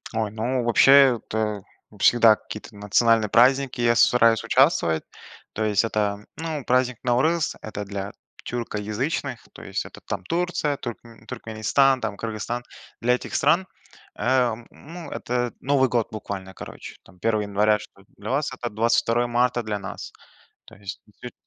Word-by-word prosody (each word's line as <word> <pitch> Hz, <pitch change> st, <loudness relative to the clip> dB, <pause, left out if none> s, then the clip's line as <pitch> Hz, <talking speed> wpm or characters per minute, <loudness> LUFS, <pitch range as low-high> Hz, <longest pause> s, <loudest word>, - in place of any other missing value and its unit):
Ой, 110 Hz, -2 st, -1 dB
ну 120 Hz, +3 st, -1 dB
вообще 135 Hz, +2 st, +6 dB
это 105 Hz, -2 st, -3 dB, 0.4 s
всегда 115 Hz, -2 st, +6 dB
какие-то 105 Hz, 0 st, -10 dB
национальные 105 Hz, +2 st, +2 dB
праздники, 130 Hz, +2 st, +3 dB
я 120 Hz, 0 st, +3 dB
с -, -, +5 dB
стараюсь 115 Hz, -2 st, +4 dB
участвовать. 115 Hz, -, +2 dB, 0.5 s
То 110 Hz, -, -2 dB
есть 105 Hz, 0 st, +2 dB
это, 105 Hz, -1 st, -2 dB
ну, 160 Hz, -4 st, -4 dB
праздник 125 Hz, -1 st, +1 dB
Наурыз- 150 Hz, +7 st, +1 dB
это 105 Hz, -1 st, -6 dB
для 100 Hz, 0 st, -5 dB, 0.3 s
тюркоязычных. 120 Hz, +4 st, -3 dB
То -, -, -12 dB
есть -, -, -4 dB
это -, -, -12 dB
там 95 Hz, -, -4 dB
Турция, 165 Hz, -, -1 dB
туркме 115 Hz, -1 st, -9 dB
Туркменистан, 125 Hz, +3 st, +1 dB
там 105 Hz, -2 st, -3 dB
Кыргызстан. 115 Hz, +2 st, -4 dB, 0.4 s
Для 125 Hz, +1 st, +3 dB
этих -, -, -7 dB
стран, 170 Hz, +6 st, +3 dB, 0.5 s
э, 125 Hz, -2 st, +2 dB, 0.2 s
ну, 165 Hz, +2 st, -10 dB
это 120 Hz, -1 st, -2 dB
Новый 135 Hz, -1 st, +2 dB
год 115 Hz, -1 st, 0 dB
буквально. 95 Hz, -3 st, -6 dB
Короче, -, -, -10 dB
там 90 Hz, -1 st, -20 dB
1 110 Hz, +1 st, 0 dB
января 105 Hz, +1 st, +2 dB
что 100 Hz, -, -14 dB, 0.2 s
для 105 Hz, +1 st, -7 dB
вас- 140 Hz, +2 st, 0 dB
это 120 Hz, -2 st, -5 dB
22 115 Hz, +2 st, +1 dB
марта 120 Hz, 0 st, +1 dB
для 105 Hz, -2 st, -3 dB
нас. 95 Hz, -, -8 dB, 0.5 s
То -, -, -16 dB
есть 100 Hz, 0 st, -8 dB
несет 120 Hz, +4 st, -11 dB
115 Hz, 150 wpm, -24 LUFS, 105-130 Hz, 0.5 s, вообще